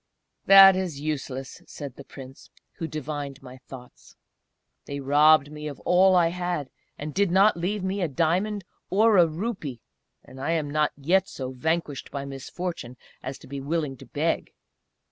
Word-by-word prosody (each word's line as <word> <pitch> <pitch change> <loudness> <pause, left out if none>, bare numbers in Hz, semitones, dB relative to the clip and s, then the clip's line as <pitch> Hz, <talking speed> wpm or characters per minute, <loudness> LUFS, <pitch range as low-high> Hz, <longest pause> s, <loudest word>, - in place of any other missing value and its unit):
"That 195 -1 +10
is 180 -6 -3
useless," 135 -3 -5
said 140 -3 -8
the - - -11
Prince, 135 -1 -12 0.3
who 165 - -4
devined 145 -3 -6
my 125 0 -11
thoughts. 125 -1 -14 0.7
"They 140 0 -5
robbed 145 +1 +4
me 150 0 -7
of 145 - -7
all 185 +1 +4
I 170 -2 +4
had, 175 -5 -3 0.3
and 150 +1 -6
did 200 -1 +2
not 195 +4 +4
leave 185 +4 -2
me 190 +1 -2
a 175 - +1
diamond, 180 +8 0 0.3
or 215 +2 +4
a 175 -2 +6
rupee; 160 - -5 0.4
and 130 - -12
I 165 - 0
am 150 -3 -1
not 150 0 +1
yet 185 +7 +2
so 130 -1 -6
vanquished 150 +2 -2
by 140 0 -5
misfortune 135 -1 -6 0.2
as 130 +1 -6
to - - -16
be 140 0 -6
willing 150 -1 -2
to - - -14
beg! - - -2
155 Hz, 165 wpm, -25 LUFS, 140-180 Hz, 0.7 s, That